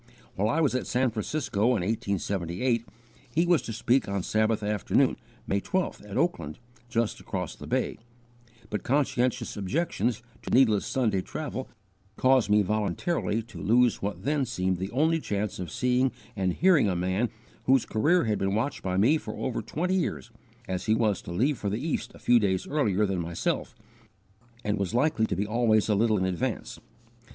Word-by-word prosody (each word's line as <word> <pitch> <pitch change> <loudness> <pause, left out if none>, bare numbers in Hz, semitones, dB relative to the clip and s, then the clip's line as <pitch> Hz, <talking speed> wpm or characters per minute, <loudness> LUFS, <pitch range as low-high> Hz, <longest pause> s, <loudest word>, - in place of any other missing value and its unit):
While 105 +3 0
I 160 +8 +2
was 145 -5 +2
at 130 - -1
San 125 0 +1
Francisco, 110 -1 -1
in 95 - -1
1878, 100 +2 -1 0.5
he 165 +2 +4
was 175 -2 +4
to - - -6
speak 120 +1 +1
on 100 -2 -1
Sabbath 110 +1 +1
afternoon, 105 -1 +2 0.3
May 100 0 0
12th, 185 - -2
at 100 - -4
Oakland, 85 - -1 0.3
just 115 -2 0
across - - -4
the - - -10
bay, - - -1 0.7
but 105 -3 -1
conscientious 130 -3 0
objections 120 - -1 0.2
to - - -7
needless 115 -5 +4
Sunday 110 -8 +1
travel 140 +2 -5 0.5
caused 130 -3 +3
me 105 0 +5
voluntarily 110 - -1
to 120 - -10
lose 120 +3 +3
what 100 0 -4
then 145 0 +1
seemed 95 -7 -1
the 95 +1 -3
only 160 +7 +2
chance 105 -8 -3
of 90 -3 -4
seeing 125 +6 +1 0.2
and 95 -3 0
hearing 165 - +4
a 90 - 0
man 95 +6 0 0.4
whose 130 -1 +4
career 155 +11 +2
had 110 -4 0
been 95 +1 0
watched 115 +7 -1
by 95 -1 -1
me 130 +11 +4
for - - -7
over 130 -3 -2
twenty 180 +5 -2
years, 115 - -1 0.4
as 95 -1 -3
he 110 - +4
was 110 -4 +1
to - - -8
leave 125 +10 +1
for 100 - -1
the 105 - -1
East 160 - -2
a - - -11
few 120 0 +4
days 95 -4 0
earlier 105 -9 +1
than 95 -2 -1
myself 85 0 -2 0.9
and 105 0 -1
was 100 +3 -2
likely 125 -4 +2
to - - -1
be 100 +3 -1
always 110 -1 +2
a - - +4
little 110 +1 +3
in 95 - 0
advance. 90 -3 -3
110 Hz, 180 wpm, -27 LUFS, 100-130 Hz, 0.9 s, me